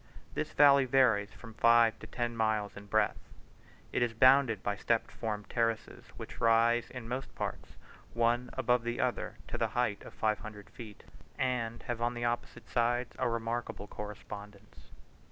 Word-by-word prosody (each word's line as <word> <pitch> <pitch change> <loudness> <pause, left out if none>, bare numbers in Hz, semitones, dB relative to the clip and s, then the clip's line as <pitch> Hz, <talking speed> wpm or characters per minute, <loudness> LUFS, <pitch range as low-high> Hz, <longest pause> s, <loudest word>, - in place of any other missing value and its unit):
This - - -3
valley 140 -2 +6
varies 115 -6 +3
from 115 -2 -12
five 115 0 +4
to - - -10
ten 120 -1 -3
miles 110 -2 0
in 100 0 -10
breadth; 110 0 +1 0.7
it - - 0
is 120 -2 +1
bounded 130 -3 +5
by 100 - -1
step 115 +3 0
formed 105 -2 -4
terraces, 115 -2 -2
which - - -9
rise 115 +1 +3
in 125 -3 -8
most 130 +3 -5
parts, - - -5 0.4
one 120 +1 +1
above 125 -1 +2
the 120 +1 -3
other, 125 -2 -1
to - - -4
the - - +2
height 115 -5 0
of - - -12
five 110 -1 0
hundred 105 -1 -10
feet, 110 -4 -11 0.3
and 120 -3 -1
have 120 -1 -4
on 120 +1 0
the 120 0 -2
opposite 120 0 -3
sides 120 +1 0
a - - +1
remarkable 115 -2 -3
correspondence. 105 0 -10
115 Hz, 165 wpm, -31 LUFS, 110-120 Hz, 0.7 s, valley